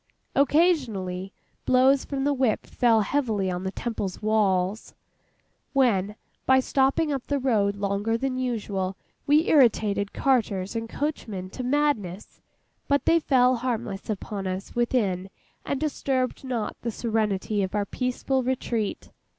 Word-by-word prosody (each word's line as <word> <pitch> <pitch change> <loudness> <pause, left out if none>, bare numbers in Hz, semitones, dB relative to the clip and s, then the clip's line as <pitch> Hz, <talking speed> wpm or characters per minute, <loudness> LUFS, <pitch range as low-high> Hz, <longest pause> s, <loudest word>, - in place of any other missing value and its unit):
Occasionally, 245 - +1 0.3
blows 260 +2 +4
from 275 -1 -2
whips 265 -6 0
fell 230 -3 +3
heavily 215 -6 0
on 180 +1 -4
the 190 - -2
Temple's 205 -4 -4
walls, 210 -2 0 0.8
when 210 -7 +2 0.3
by 260 0 +6
stopping 275 +4 +1
up 270 -3 -4
the 285 - 0
road 215 -7 +1
longer 200 +3 -1
than 265 +1 -2
usual, 205 -7 -2 0.3
we 300 +3 +4
irritated 215 -7 +3
carters 220 -7 0
and 225 0 -3
coachmen 215 -11 -4
to 255 - -6
madness; 250 -9 -1 0.5
but 280 0 +1
they 335 - +5
fell 255 -4 +3
harmless 230 -5 -3
upon 200 -1 -4
us 185 +1 -5
within 205 -6 0 0.4
and 280 - -1
disturbed 270 -4 -1
not 245 -5 -3
the 235 - -2
serenity 215 -3 -1
of 190 +1 -2
our 205 -1 +1
peaceful 255 +4 -1
retreat. 240 -4 -2
230 Hz, 130 wpm, -26 LUFS, 200-265 Hz, 0.8 s, by